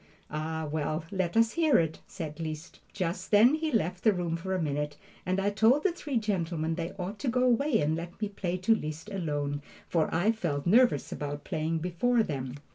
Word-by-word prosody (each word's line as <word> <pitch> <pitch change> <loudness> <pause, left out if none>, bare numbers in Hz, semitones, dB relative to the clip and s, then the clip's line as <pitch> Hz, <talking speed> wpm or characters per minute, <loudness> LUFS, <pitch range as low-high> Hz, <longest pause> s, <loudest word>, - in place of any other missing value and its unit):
"Ah, 160 +1 -3
well, 155 +1 -2
let 190 0 -1
us 230 0 +5
hear 320 -4 +4
it," 160 -1 0
said 160 -4 -6
Liszt. 155 +1 -6
Just 180 -1 -3
then 220 +6 +6
he 315 0 0
left 185 -5 0
the 220 - +6
room 175 -3 -1
for 190 +3 -3
a - - 0
minute, 150 -2 -2 0.3
and 185 +1 +1
I 200 +1 +1
told 225 +8 +4
the 390 - +3
three 295 -6 -3
gentlemen 170 -7 -1
they 170 +2 -4
ought 195 +3 -5
to 280 - -3
go 250 +1 +2
away 255 0 +3
and 155 +2 +1
let 170 +1 -7
me 215 - 0
play 185 -3 -3
to 185 +5 +3
Liszt 160 0 -4
alone, 145 -6 -2 0.3
for 165 -3 +1
I 175 +7 +3
felt 165 -10 -2
nervous 220 - +4
about 145 0 -4
playing 160 +1 -1
before 180 +8 +1
them. 135 -7 -4
175 Hz, 200 wpm, -29 LUFS, 155-220 Hz, 0.3 s, then